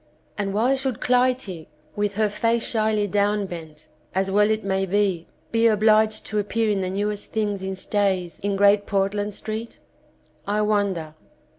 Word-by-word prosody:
And 200 -1 -2
why 230 +6 +2
should 265 -3 -2
Clytie, 250 -9 +1 0.3
with 205 -1 -1
her 215 +1 +2
face 230 +2 0
shyly 215 -2 +1
downbent, 185 -6 -2 0.3
as 190 0 0
well 210 +1 +4
it 220 0 0
may 195 0 0
be, 190 -3 0 0.2
be 230 0 +4
obliged 215 0 +3
to 215 - -1
appear 215 +2 0
in 200 -2 0
the 185 - -2
newest 205 +2 -3
things 205 -3 -1
in 190 0 -3
stays, 190 -3 -1
in 200 0 -1
Great 200 +1 +4
Portland 205 +1 -1
Street? 220 +1 -6 0.7
I 210 +1 +1
wonder. 200 -7 0
205 Hz, 155 wpm, -23 LUFS, 195-215 Hz, 0.7 s, well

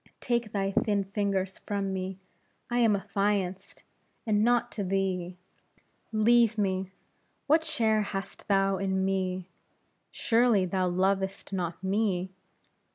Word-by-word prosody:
Take 235 -3 -1
thy 195 -1 -1
thin 200 0 +1
fingers 195 -1 -2
from 200 -2 -3
me; 190 0 -4 0.5
I 240 - +1
am 225 -3 +4
affianced, 195 -1 -2 0.4
and 210 -2 +2
not 240 +1 +2
to 205 - -3
thee. 185 -2 -1 0.7
Leave 230 0 +4
me! 190 -2 0 0.6
what 315 +3 +4
share 220 -8 +2
hast 195 -1 -6
thou 195 -1 +2
in 190 0 0
me? 185 -1 -1 0.6
Surely, 230 -4 +2
thou 185 0 0
lovest 190 +2 -1
not 180 -1 -3
me? 190 -2 0
195 Hz, 120 wpm, -28 LUFS, 190-215 Hz, 0.7 s, am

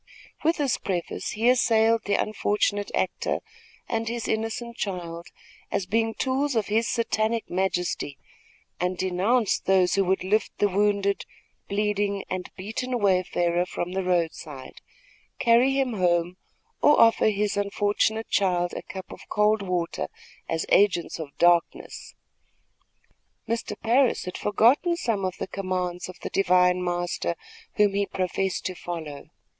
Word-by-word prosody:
With 325 +2 +2
this 280 -5 0
preface 180 +4 -3
he 225 +2 0
assailed 230 -2 +3
the 200 - +1
unfortunate 205 -1 0
actor - - -1 0.5
and 225 0 -2
his 235 0 -3
innocent 225 +2 -2
child 170 -3 -4 0.4
as 190 - -1
being 225 +3 0
tools 270 +1 0
of 220 -2 0
his 225 +2 +2
Satanic 230 -1 0
majesty, 180 -6 -1 0.6
and 180 +1 -1
denounced 190 +6 +1
those 185 -2 +3
who 195 - +3
would 190 0 +1
lift 210 +4 0
the 205 - +2
wounded, 200 0 +1 0.5
bleeding 205 -1 0
and 185 0 -3
beaten 225 +6 -3
wayfarer 180 -4 +1
from 180 -1 -4
the 190 +1 -2
road 175 -3 +1
side, 135 -5 -10 0.6
carry 240 +3 +4
him 270 -3 0
home, 175 -2 +1 0.4
or 295 - +5
offer 225 -1 +5
his 210 0 0
unfortunate 205 +2 0
child 180 -3 +1
a - - -4
cup 190 -1 -9
of - - -12
cold 210 0 +2
water 180 -3 -2 0.4
as 165 -1 -1
agents 190 -5 +3
of 145 -3 -8
darkness. 175 -1 +1 1.3
Mr. 225 -2 -3
Parris 245 +3 +2
had 180 - -6
forgotten 255 - +3
some 220 - -1
of 185 -1 -2
the - - -3
commands 185 -2 -3
of 185 - -9
the - - -4
divine 180 -1 +3
Master, 175 -1 -2 0.4
whom 205 -2 +3
he 200 0 0
professed 190 0 -2
to 185 - -2
follow. 160 -5 -7
200 Hz, 140 wpm, -25 LUFS, 180-225 Hz, 1.3 s, or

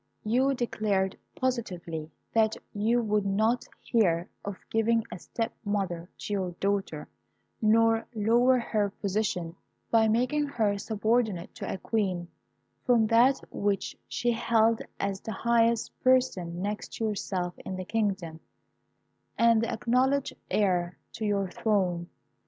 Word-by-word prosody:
You 260 +5 +2
declared 205 -5 0 0.2
positively 180 -11 -3 0.2
that 220 -1 +3 0.2
you 230 +4 +2
would 210 -1 +1
not 215 +5 +1 0.2
hear 175 -7 +2 0.2
of 200 -2 -5
giving 225 +1 +2
a 175 - -6
step 225 +6 -3
mother 190 -5 -2
to 210 - -5
your 190 -3 -1
daughter, 195 -6 -1 0.5
nor 225 +1 +4
lower 240 +4 +4
her 215 -4 0
position, 195 -4 -2 0.4
by 225 -1 +5
making 255 +7 +1
her 215 -7 0
subordinate 215 -4 0
to - - -5
a - - -3
queen, 185 -4 -1 0.5
from 235 -3 +4
that 240 +5 +5
which 200 -1 -1
she 240 - 0
held 230 0 +2 0.2
as 195 -1 -2
the 220 - -5
highest 230 +2 +2
person 190 -10 +2
next 210 +1 -4
to 225 - -2
yourself 190 -4 -2
in 190 - -6
the 185 0 -5
kingdom, 190 -7 -1 1.0
and 230 -1 +5
the 230 - -1
acknowledged 255 +4 +1 0.2
heir 180 -4 +1 0.2
to 220 - -4
your 200 -2 +1
throne. 180 -5 0
215 Hz, 130 wpm, -28 LUFS, 190-230 Hz, 1.0 s, by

